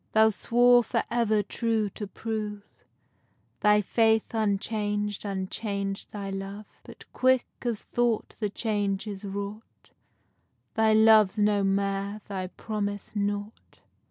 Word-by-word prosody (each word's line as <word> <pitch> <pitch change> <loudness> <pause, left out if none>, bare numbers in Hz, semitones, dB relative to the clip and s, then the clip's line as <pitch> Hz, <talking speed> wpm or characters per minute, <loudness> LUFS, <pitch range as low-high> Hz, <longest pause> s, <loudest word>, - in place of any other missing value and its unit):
Thou 220 0 +6
swore 245 +3 +4
for 230 0 -1
ever 220 -3 +2
true 225 0 0
to 210 - -6
prove, 210 -1 -4 1.0
Thy 210 0 +4
faith 220 +2 +2
unchang'd, 210 -1 -1
unchang'd 200 0 -3
thy 200 -2 -5
love; 195 +2 -6 0.2
But - - -13
quick 255 -1 +3 0.2
as 235 -4 -2
thought 240 -2 -1
the 210 -2 -1
change 205 -2 -1
is 205 -1 -6
wrought, 200 +2 -7 0.8
Thy 220 0 +3
love's 220 -2 +6
no 205 -1 +3
mair, 195 +1 -1
thy 190 -2 -4
promise 205 +1 -5
nought. 205 +1 -4
210 Hz, 120 wpm, -27 LUFS, 200-220 Hz, 1.0 s, Thou